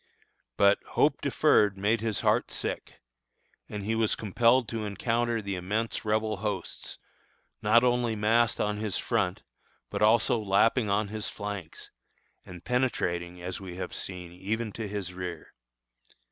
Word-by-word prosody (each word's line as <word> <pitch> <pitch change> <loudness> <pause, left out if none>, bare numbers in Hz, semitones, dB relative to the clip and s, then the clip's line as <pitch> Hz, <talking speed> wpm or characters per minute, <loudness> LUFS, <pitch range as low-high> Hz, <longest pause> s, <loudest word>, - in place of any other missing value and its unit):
But 100 0 +5 0.2
"hope - - +3
deferred 100 -2 +3
made 105 +3 +1
his 110 -2 -1
heart - - +2
sick," - - -5 0.7
and 105 -1 -5
he 110 +3 -1
was 110 -1 +2
compelled 115 +4 +3
to 115 -1 -3
encounter 115 +2 -1
the 100 0 -3
immense 105 +5 -2
Rebel 110 0 0
hosts, 100 -3 -4 0.6
not 110 +3 +5
only 120 -2 +2
massed 115 +2 +2
on 105 0 0
his 105 -2 -1
front, 100 -6 -1 0.5
but - - -3
also 115 +2 +4
lapping 110 +3 +3
on 100 +1 +1
his 110 0 -3
flanks, 100 -5 -7 0.5
and 90 -1 -11
penetrating, 90 -9 -1
as 90 +2 -5
we 90 -2 -7
have 90 0 -5
seen, 90 -2 -4
even 105 +5 -3
to 110 +1 -5
his 100 -3 -4
rear. 90 -3 -6
105 Hz, 145 wpm, -28 LUFS, 95-115 Hz, 0.7 s, But